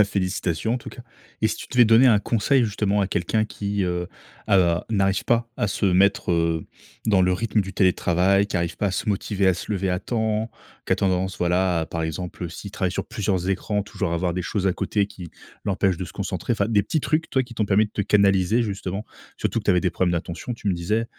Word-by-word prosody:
Bah, -, -, +7 dB
félicitations 95 Hz, +1 st, -1 dB
en -, -, -1 dB
tout -, -, -10 dB
cas, 120 Hz, -, -10 dB, 0.4 s
et 110 Hz, -, +5 dB
si -, -, -3 dB
tu -, -, -8 dB
devais 125 Hz, -1 st, +6 dB
donner 115 Hz, +4 st, +6 dB
un 115 Hz, -4 st, +6 dB
conseil 120 Hz, +5 st, +2 dB
justement 105 Hz, -1 st, 0 dB
à -, -, +1 dB
quelqu'un 95 Hz, +4 st, 0 dB
qui, 100 Hz, -1 st, -3 dB
heu, 90 Hz, 0 st, -2 dB, 0.4 s
a 85 Hz, -3 st, +3 dB
n'arrive 95 Hz, -3 st, +1 dB
pas 115 Hz, 0 st, +2 dB
à -, -, +1 dB
se 100 Hz, -, -2 dB
mettre, 95 Hz, +1 st, +3 dB
heu, 85 Hz, -1 st, 0 dB, 0.4 s
dans 105 Hz, -4 st, +3 dB
le 90 Hz, 0 st, +3 dB
rythme 110 Hz, +1 st, 0 dB
du 95 Hz, 0 st, -5 dB
télétravail, 95 Hz, +1 st, +3 dB
qui 100 Hz, -, -3 dB
arrive 85 Hz, 0 st, -2 dB
pas 105 Hz, -, +1 dB
à -, -, +1 dB
se 95 Hz, -, -3 dB
motiver, 100 Hz, 0 st, 0 dB
à 95 Hz, -, +5 dB
se 85 Hz, +4 st, -6 dB
lever 95 Hz, -2 st, 0 dB
à 90 Hz, -, 0 dB
temps, 110 Hz, -1 st, -1 dB, 0.4 s
qui -, -, +3 dB
a -, -, -7 dB
tendance, 95 Hz, 0 st, 0 dB
voilà, 90 Hz, 0 st, +1 dB
à, 80 Hz, -, -3 dB
par 85 Hz, -, -4 dB
exemple, 85 Hz, +3 st, -4 dB
heu, 85 Hz, -, -3 dB
s'il 100 Hz, +5 st, -8 dB
travaille 95 Hz, -2 st, -1 dB
sur -, -, -3 dB
plusieurs 95 Hz, -3 st, -1 dB
écrans, 105 Hz, +2 st, -1 dB
toujours 100 Hz, -4 st, -3 dB
avoir 85 Hz, +1 st, 0 dB
des 90 Hz, -, -2 dB
choses 95 Hz, +2 st, -2 dB
à 95 Hz, -, +3 dB
côté 105 Hz, +2 st, 0 dB
qui 95 Hz, -4 st, -10 dB, 0.4 s
l'empêchent 95 Hz, -2 st, +1 dB
de 95 Hz, -, -4 dB
se 85 Hz, -, -11 dB
concentrer, 100 Hz, +4 st, -2 dB
fin 100 Hz, -, +1 dB
des 110 Hz, -3 st, +2 dB
petits 155 Hz, -, -1 dB
trucs, 155 Hz, +3 st, 0 dB
toi, 130 Hz, -, +1 dB
qui 120 Hz, -1 st, -11 dB
t'ont 110 Hz, -2 st, 0 dB
permis 105 Hz, +2 st, +4 dB
de -, -, -17 dB
te -, -, -2 dB
canaliser 100 Hz, +2 st, +3 dB
justement. 100 Hz, -1 st, -4 dB, 0.3 s
Surtout -, -, -1 dB
que -, -, -5 dB
tu -, -, +3 dB
avais 90 Hz, -, +3 dB
des 90 Hz, -, +1 dB
problèmes 90 Hz, +1 st, 0 dB
d'attention, 85 Hz, +7 st, -4 dB
tu 105 Hz, -, -4 dB
me 95 Hz, -, +3 dB
disais, 100 Hz, +7 st, -1 dB
100 Hz, 245 wpm, -23 LUFS, 90-105 Hz, 0.4 s, Bah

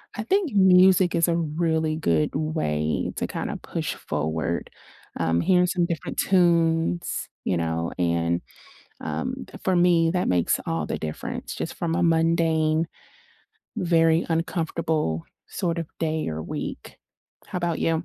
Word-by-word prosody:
I 215 Hz, -, -3 dB
think 370 Hz, -, +1 dB
music 185 Hz, -1 st, +5 dB
is 170 Hz, -1 st, +3 dB
a 170 Hz, -, +2 dB
really 160 Hz, 0 st, 0 dB
good 85 Hz, -, +1 dB
way 140 Hz, -, -1 dB
to -, -, -1 dB
kinda -, -, -4 dB
push -, -, -3 dB
forward, 80 Hz, +2 st, -2 dB, 0.5 s
um, 80 Hz, 0 st, +1 dB
hearing 180 Hz, -, +4 dB
some 175 Hz, -1 st, +1 dB
different 170 Hz, -2 st, -4 dB
tunes, 170 Hz, -2 st, +2 dB, 0.2 s
you 90 Hz, -, +1 dB
know, 85 Hz, 0 st, -1 dB
and, 85 Hz, -1 st, +1 dB, 0.6 s
um, -, -, -3 dB, 0.2 s
for 190 Hz, -, +2 dB
me, 175 Hz, -2 st, +4 dB
that 180 Hz, +1 st, 0 dB
makes 90 Hz, -2 st, +2 dB
all 80 Hz, -2 st, -1 dB
the -, -, -3 dB
difference, 75 Hz, 0 st, -5 dB
just -, -, -4 dB
from 165 Hz, -1 st, -1 dB
a 180 Hz, -, +1 dB
mundane, 165 Hz, -1 st, +2 dB, 0.9 s
very 165 Hz, -4 st, +3 dB
uncomfortable 165 Hz, -, -1 dB, 0.2 s
sort 170 Hz, -2 st, -2 dB
of 165 Hz, -, -3 dB
day 160 Hz, -1 st, -1 dB
or 80 Hz, 0 st, -4 dB
week. -, -, -6 dB, 0.5 s
How -, -, -3 dB
'bout 170 Hz, -2 st, -1 dB
you? 165 Hz, 0 st, +1 dB
165 Hz, 140 wpm, -25 LUFS, -, 0.9 s, music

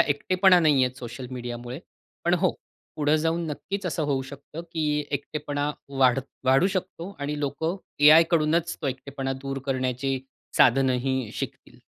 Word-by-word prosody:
एकटेपणा 185 Hz, +6 st, +4 dB
नाहीये 140 Hz, -6 st, +4 dB
सोशल 125 Hz, 0 st, -7 dB
मीडियामुळे. 120 Hz, 0 st, -6 dB, 0.5 s
पण 175 Hz, -, +4 dB
हो, 180 Hz, 0 st, +2 dB, 0.5 s
पुढं 150 Hz, 0 st, +3 dB
जाऊन 165 Hz, +1 st, 0 dB
नक्कीच 195 Hz, +6 st, -4 dB
असं 165 Hz, -1 st, -1 dB
होऊ 140 Hz, -2 st, 0 dB
शकतं 145 Hz, +4 st, -9 dB
की 160 Hz, -, -1 dB, 0.3 s
एकटेपणा 145 Hz, 0 st, -2 dB, 0.3 s
वाढत 130 Hz, 0 st, +3 dB, 0.2 s
वाढू 135 Hz, +7 st, +5 dB
शकतो 185 Hz, -1 st, -4 dB
आणि 145 Hz, +1 st, -2 dB
लोक 145 Hz, +2 st, -3 dB, 0.4 s
एआयकडूनच 165 Hz, +1 st, +5 dB
तो 145 Hz, -, -1 dB
एकटेपणा 135 Hz, +1 st, -3 dB
दूर 135 Hz, 0 st, -3 dB
करण्याची 130 Hz, 0 st, -1 dB, 0.4 s
साधनंही 130 Hz, -1 st, +3 dB
शिकतील. -, -, -7 dB
145 Hz, 130 wpm, -26 LUFS, 130-160 Hz, 0.5 s, वाढू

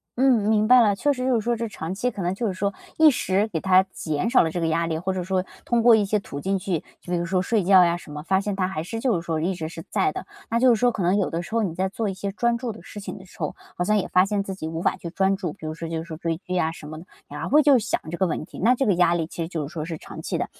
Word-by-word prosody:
嗯， 245 Hz, -5 st, +3 dB
明 215 Hz, -1 st, +3 dB
白 250 Hz, +1 st, +8 dB
了。 210 Hz, -4 st, +4 dB
确 290 Hz, +9 st, +1 dB
实 255 Hz, -2 st, -2 dB
就 260 Hz, -1 st, +2 dB
是 225 Hz, -, +1 dB
说 235 Hz, +2 st, 0 dB
这 230 Hz, +1 st, -3 dB
长 180 Hz, -4 st, -5 dB
期 245 Hz, +6 st, -1 dB
可 200 Hz, -, -6 dB
能 175 Hz, +1 st, 0 dB
就 230 Hz, +3 st, -2 dB
是 190 Hz, -, -1 dB
说 200 Hz, +2 st, -1 dB, 0.2 s
一 315 Hz, -1 st, +7 dB
时 200 Hz, -4 st, 0 dB
给 170 Hz, -7 st, -3 dB
它 190 Hz, +1 st, +5 dB
减 155 Hz, +4 st, -2 dB
少 250 Hz, -, +5 dB
了 160 Hz, -, -1 dB
这 175 Hz, -, -3 dB
个 165 Hz, -, +1 dB
压 165 Hz, +1 st, +1 dB
力， 160 Hz, -, -1 dB
或 180 Hz, +4 st, -2 dB
者 185 Hz, -1 st, -3 dB
说 185 Hz, 0 st, 0 dB, 0.2 s
通 235 Hz, -1 st, +2 dB
过 235 Hz, -1 st, +7 dB
一 210 Hz, -2 st, +2 dB
些 210 Hz, +2 st, +1 dB
途 140 Hz, -7 st, -7 dB
径 195 Hz, +6 st, 0 dB
去， 185 Hz, -3 st, -2 dB, 0.2 s
就 175 Hz, -, -9 dB
比 180 Hz, -, +2 dB
如 170 Hz, -, -1 dB
说 185 Hz, +1 st, +1 dB
睡 210 Hz, +1 st, +1 dB
觉 185 Hz, 0 st, +7 dB
呀 170 Hz, 0 st, +2 dB
什 175 Hz, -, -12 dB
么， 150 Hz, 0 st, -6 dB
发 190 Hz, +3 st, +2 dB
现 200 Hz, 0 st, -2 dB
它 185 Hz, -1 st, 0 dB
还 165 Hz, -4 st, -4 dB
是 225 Hz, +6 st, -5 dB
就 240 Hz, -5 st, +1 dB
是 165 Hz, -, -1 dB
说 160 Hz, -2 st, -1 dB
一 185 Hz, +4 st, 0 dB
直 160 Hz, -2 st, -4 dB
是 165 Hz, 0 st, -8 dB
在 385 Hz, -, +1 dB
的， 375 Hz, -, -6 dB, 0.2 s
那 230 Hz, +1 st, +1 dB
就 255 Hz, -1 st, +6 dB
是 225 Hz, -, 0 dB
说 245 Hz, +1 st, +3 dB
可 200 Hz, -5 st, -3 dB
能 180 Hz, +3 st, +3 dB
有 195 Hz, -, 0 dB
的 165 Hz, -, -2 dB
时 175 Hz, -, -10 dB
候 230 Hz, -, +2 dB
你 180 Hz, -5 st, -2 dB
在 190 Hz, +2 st, 0 dB
做 220 Hz, +3 st, -3 dB
一 -, -, -3 dB
些 195 Hz, +1 st, -4 dB
专 235 Hz, +3 st, +1 dB
注 235 Hz, -1 st, -4 dB
的 220 Hz, -, -11 dB
事 205 Hz, -, -9 dB
情 200 Hz, -, -7 dB
的 190 Hz, -, -12 dB
时 -, -, -19 dB
候， 150 Hz, -3 st, -3 dB, 0.2 s
好 175 Hz, -, -1 dB
像 210 Hz, +3 st, +2 dB
也 195 Hz, -, -1 dB
发 185 Hz, +1 st, +4 dB
现 200 Hz, 0 st, -1 dB
自 195 Hz, -1 st, -5 dB
己 160 Hz, -, -5 dB
无 165 Hz, +1 st, -4 dB
法 -, -, +1 dB
去 170 Hz, -, -7 dB
专 190 Hz, +2 st, +1 dB
注， 185 Hz, -4 st, -4 dB
比 155 Hz, -, -11 dB
如 155 Hz, -, -3 dB
说 165 Hz, 0 st, -6 dB
就 165 Hz, -1 st, -3 dB
是 165 Hz, -1 st, -7 dB
追 165 Hz, -1 st, -2 dB
剧 180 Hz, 0 st, -7 dB
呀 165 Hz, -3 st, +1 dB
什 150 Hz, -2 st, -10 dB
么 155 Hz, -, -7 dB
的， 175 Hz, -, -12 dB, 0.2 s
然 150 Hz, +1 st, -7 dB
后 -, -, -3 dB
会 300 Hz, +2 st, +6 dB
就 280 Hz, -2 st, +6 dB
想 225 Hz, +1 st, -1 dB
这 170 Hz, -, -4 dB
个 190 Hz, -, +2 dB
问 155 Hz, -, -3 dB
题， -, -, -12 dB
那 240 Hz, +6 st, +4 dB
这 270 Hz, -, 0 dB
个 200 Hz, -, +3 dB
压 175 Hz, -1 st, +3 dB
力 165 Hz, -2 st, -1 dB
其 170 Hz, -, -7 dB
实 -, -, -4 dB
就 155 Hz, -5 st, -3 dB
是 155 Hz, -, -13 dB
说 155 Hz, -3 st, -3 dB
是 165 Hz, -1 st, -5 dB
长 -, -, -10 dB
期 -, -, -2 dB
的。 -, -, -1 dB
190 Hz, 375 characters per minute, -24 LUFS, 170-220 Hz, 0.2 s, 白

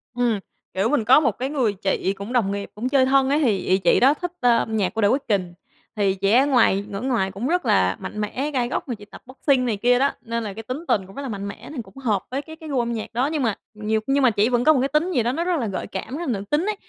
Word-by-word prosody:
Ừm, 240 Hz, -4 st, +1 dB, 0.3 s
kiểu, 195 Hz, +4 st, +1 dB
mình 275 Hz, -6 st, +1 dB
có 255 Hz, +5 st, +7 dB
một 275 Hz, -7 st, +2 dB
cái 255 Hz, +6 st, -4 dB
người 260 Hz, -8 st, +1 dB
chị 195 Hz, 0 st, -1 dB
cũng 200 Hz, +5 st, -6 dB
đồng 225 Hz, -6 st, +2 dB
nghiệp 200 Hz, 0 st, -4 dB
cũng 240 Hz, +5 st, -2 dB
chơi 265 Hz, -1 st, +4 dB
thân 265 Hz, 0 st, +3 dB
á 285 Hz, -, +3 dB
thì 225 Hz, -9 st, +2 dB
ị 185 Hz, 0 st, +1 dB
chị 180 Hz, -3 st, +3 dB
đó 270 Hz, +3 st, +5 dB
thích, 355 Hz, +3 st, -5 dB
a, 240 Hz, -2 st, +4 dB
âm 220 Hz, -1 st, -1 dB
nhạc 195 Hz, -4 st, 0 dB
của 225 Hz, -, -1 dB
The 205 Hz, -, +5 dB
Weeknd. 200 Hz, -8 st, 0 dB, 0.4 s
Thì 200 Hz, -2 st, +1 dB
chị 195 Hz, +1 st, 0 dB
ấy 260 Hz, +5 st, +5 dB
ngoài 225 Hz, -7 st, +3 dB
ở 200 Hz, -1 st, -5 dB
ngoài 235 Hz, -7 st, 0 dB
cũng 200 Hz, +6 st, -4 dB
rất 355 Hz, +3 st, 0 dB
là 95 Hz, 0 st, +3 dB
mạnh 210 Hz, -, -5 dB
mẽ, 265 Hz, +8 st, -2 dB
gai 250 Hz, -4 st, 0 dB
góc -, -, -3 dB
mà 245 Hz, -, -3 dB
chị 205 Hz, -1 st, -14 dB
tập 205 Hz, -, -14 dB
boxing 260 Hz, 0 st, +1 dB
này 225 Hz, -4 st, -1 dB
kia 245 Hz, +4 st, +3 dB
đó, 280 Hz, +1 st, +3 dB
nên 230 Hz, 0 st, -3 dB
là 205 Hz, -3 st, -5 dB
cái 225 Hz, -, -8 dB
tính 260 Hz, +9 st, -6 dB
tình 190 Hz, -, +1 dB
cũng 195 Hz, -, -14 dB
rất -, -, -5 dB
là 275 Hz, -, -5 dB
mạnh 200 Hz, -2 st, -5 dB
mẽ 215 Hz, +3 st, -9 dB
thì 250 Hz, -, -3 dB
cũng 225 Hz, -, -16 dB
hợp 220 Hz, -8 st, 0 dB
với 270 Hz, +2 st, -2 dB
cái 315 Hz, +2 st, -11 dB
cái 320 Hz, -1 st, -10 dB
gu 270 Hz, -3 st, 0 dB
âm 235 Hz, 0 st, -1 dB
nhạc 225 Hz, 0 st, -6 dB
đó. 250 Hz, +4 st, +1 dB
Nhưng 305 Hz, -4 st, -1 dB
mà 225 Hz, -4 st, +1 dB, 0.2 s
nhiều 215 Hz, +1 st, -1 dB
nhưng 275 Hz, 0 st, +2 dB
mà 255 Hz, -, +6 dB
chỉ 210 Hz, +2 st, +2 dB
vẫn 245 Hz, -1 st, +1 dB
có 310 Hz, -, +6 dB
một 275 Hz, -, +2 dB
cái 265 Hz, -, +1 dB
tính 300 Hz, +6 st, 0 dB
gì 250 Hz, -9 st, +1 dB
đó 240 Hz, -, +1 dB
nó 320 Hz, +6 st, -2 dB
rất 350 Hz, -2 st, 0 dB
là 230 Hz, -, -1 dB
gợi 195 Hz, -, -4 dB
cảm, 250 Hz, +8 st, -5 dB
rất -, -, -5 dB
là -, -, +1 dB
nữ -, -, -6 dB
tính 300 Hz, +4 st, +1 dB
ấy, 425 Hz, 0 st, -1 dB
240 Hz, 315 wpm, -23 LUFS, 205-270 Hz, 0.4 s, có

